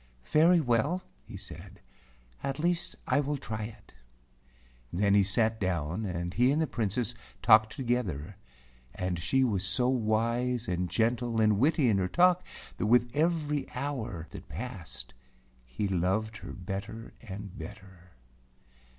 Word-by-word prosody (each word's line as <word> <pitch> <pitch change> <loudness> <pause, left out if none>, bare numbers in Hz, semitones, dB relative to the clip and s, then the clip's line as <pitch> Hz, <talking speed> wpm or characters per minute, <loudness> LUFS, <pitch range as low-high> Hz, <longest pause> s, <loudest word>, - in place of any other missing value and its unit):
"Very 170 +3 +6
well," 145 +7 +1 0.2
he - - -9
said, - - -10 0.6
"at 135 0 -2
least 170 +2 0
I - - +2
will 145 0 -1
try 110 -4 -4
it." 110 - -12 1.0
Then 100 +2 +2
he 100 - +6
sat 110 +3 +1
down, 90 +1 -1
and 85 -2 -3
he 125 +5 +4
and 150 - +2
the 160 - +3
Princess 115 -2 -1 0.3
talked 110 0 +6
together, 105 - -2 0.6
and 90 -2 -2
she 110 +11 +2
was 105 -7 +1
so 125 +6 +2
wise 120 +1 +1
and 90 0 -1
gentle 115 +4 +1
and 105 -2 +4
witty 145 +1 +3
in 105 -4 +3
her 90 - +1
talk 180 - +4 0.3
that 105 - 0
with 120 +1 +4
every 150 -3 +1
hour 120 - -3
that - - -10
passed 60 0 -7 0.5
he 65 +12 -2
loved 95 +4 0
her - - -8
better 100 +4 -6
and 100 -3 -8
better. 90 +2 -11
110 Hz, 140 wpm, -30 LUFS, 95-130 Hz, 1.0 s, Very